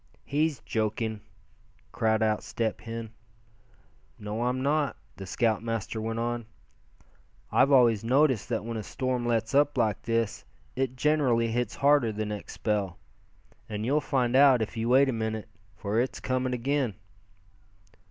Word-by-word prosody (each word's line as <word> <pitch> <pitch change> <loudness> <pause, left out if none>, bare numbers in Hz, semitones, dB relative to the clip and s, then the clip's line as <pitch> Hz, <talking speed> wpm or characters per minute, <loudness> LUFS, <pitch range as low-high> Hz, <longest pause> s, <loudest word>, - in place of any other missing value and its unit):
"He's 150 0 0
joking," 110 0 -2 0.7
cried 110 0 +1
out 110 -1 +1
Step 115 -2 -3
Hen. 115 -1 -6 1.1
"No, 105 +3 -3
I'm 125 +1 0
not," 145 -1 +1 0.2
the 95 - -8
scoutmaster 115 0 -1
went 115 +1 -3
on. 120 -1 -2 1.0
"I've 135 +2 +4
always 120 -6 +5
noticed 130 -1 +2
that 115 -2 -2
when 115 -1 -4
a - - -3
storm 125 +2 -2
lets 115 +1 0
up 145 0 +3
like 110 -5 +1
this, 115 -2 -1 0.3
it 130 -1 -1
generally 130 -5 +2
hits 120 -1 -1
harder 140 -4 +3
the 105 0 -3
next 105 -1 -6
spell. 100 -5 -1 0.7
And 105 0 -3
you'll 145 +5 +2
find 125 -4 0
out, 135 -4 +6
if 110 - -7
you 115 +1 -1
wait 135 +2 +6
a 130 - 0
minute, 110 -1 -3 0.3
for 105 +2 -1
it's 130 - -3
coming 130 0 -1
again." 130 -3 -1
115 Hz, 145 wpm, -28 LUFS, 110-130 Hz, 1.1 s, out